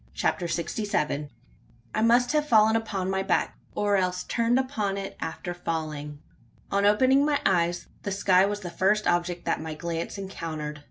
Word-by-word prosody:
CHAPTER 175 - 0
SIXTY 170 +5 -2
SEVEN. 150 -7 0
PASSED 145 - -9
BY 115 - -32
THE 120 - -35
PURSUIT. 120 -2 -32
I 215 - 0
must 245 +1 +4
have 300 0 +1
fallen 220 -1 +5
upon 200 -4 -1
my 190 0 0
back, 195 - 0 0.2
or 205 -1 +2
else 180 -1 0
turned 235 +1 +1
upon 215 -7 -1
it 195 - -5
after 165 +2 -4
falling. 155 -4 -4 0.5
On 200 +1 +3
opening 260 +6 +4
my 290 -1 +2
eyes, 175 -2 +2 0.2
the 200 - -4
sky 190 -1 +4
was 205 0 -3
the 175 -3 -6
first 195 +4 +2
object 175 0 0
that - - 0
my 160 -1 -5
glance 170 +3 -4
encountered. 160 -6 -5
190 Hz, 195 wpm, -26 LUFS, 165-210 Hz, 0.5 s, fallen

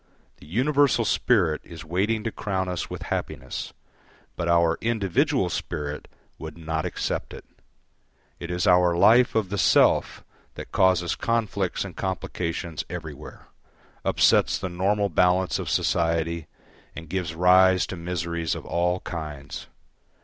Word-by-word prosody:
The - - -16
universal 130 - +2
spirit 90 -10 +2
is 85 0 -11
waiting 100 +7 0
to 115 - -2
crown 95 -3 -2
us 90 -2 -3
with - - -6
happiness, 65 0 -5 0.6
but 85 - -3
our 85 -1 +3
individual 115 - +1
spirit 75 -3 -4 0.3
would 80 0 -8
not 80 -1 -3
accept - - -3
it. - - -12 0.9
It 85 - -7
is 90 0 -1
our 90 -1 +4
life 115 +7 +5
of 110 -4 +1
the 100 +1 -2
self - - +3 0.3
that - - -9
causes 90 -2 +2
conflicts 105 -6 -1
and 95 - -9
complications 85 -4 -3
everywhere, 80 -4 -9 0.5
upsets - - +3
the 95 - -4
normal 100 +3 0
balance 90 +2 +2
of - - -4
society 85 -1 0 0.5
and 80 0 -8
gives 85 -1 -3
rise 90 0 +5
to 90 - -6
miseries 85 -1 -3
of - - -8
all 90 +1 0
kinds. 75 -5 -7
90 Hz, 135 wpm, -25 LUFS, 85-100 Hz, 0.9 s, life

